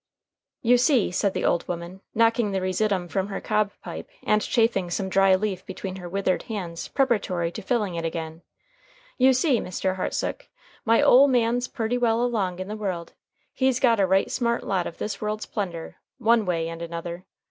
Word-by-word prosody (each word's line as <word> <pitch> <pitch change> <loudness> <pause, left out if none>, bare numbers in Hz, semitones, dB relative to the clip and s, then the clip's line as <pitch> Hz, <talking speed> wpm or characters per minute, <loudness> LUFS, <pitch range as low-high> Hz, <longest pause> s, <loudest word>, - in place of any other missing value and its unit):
"You 245 +1 +5
see," 250 - +3
said 195 +2 0
the - - -1
old 170 - +1
woman, 175 +2 -6
knocking 230 -1 +3
the 190 - +1
residuum 185 0 0
from 190 +2 -1
her 200 - -4
cob 210 -1 0
pipe, - - -7
and 215 0 +2
chafing 225 -7 +1
some 190 +2 -2
dry 195 0 +5
leaf 190 -1 -2
between 190 0 -6
her 180 -2 -7
withered 190 0 0
hands 175 -6 -4
preparatory 200 -10 0
to - - -7
filling 210 -3 0
it 165 -1 -3
again, 165 0 -4 0.8
"you 260 +1 +6
see, 260 -1 +2
Mr. 185 +1 -2
Hartsook, - - -3 0.4
my 230 0 +4
ole 270 +3 +7
man's 245 -1 +1
purty 240 +1 -2
well 235 -1 +2
along 205 -7 -1
in 185 0 -5
the 210 - -4
world. 185 -6 -4 0.4
He's 260 -2 +1
got 235 -4 +3
a 195 - +3
right 190 +1 +2
smart 235 -2 0
lot 185 -3 -1
of 165 - -8
this 205 -2 -4
world's 215 0 -2
plunder, 175 -6 -5 0.2
one 230 -4 +3
way 165 -2 0
and 165 0 -7
another." 170 +1 -6
200 Hz, 185 wpm, -25 LUFS, 180-230 Hz, 0.8 s, ole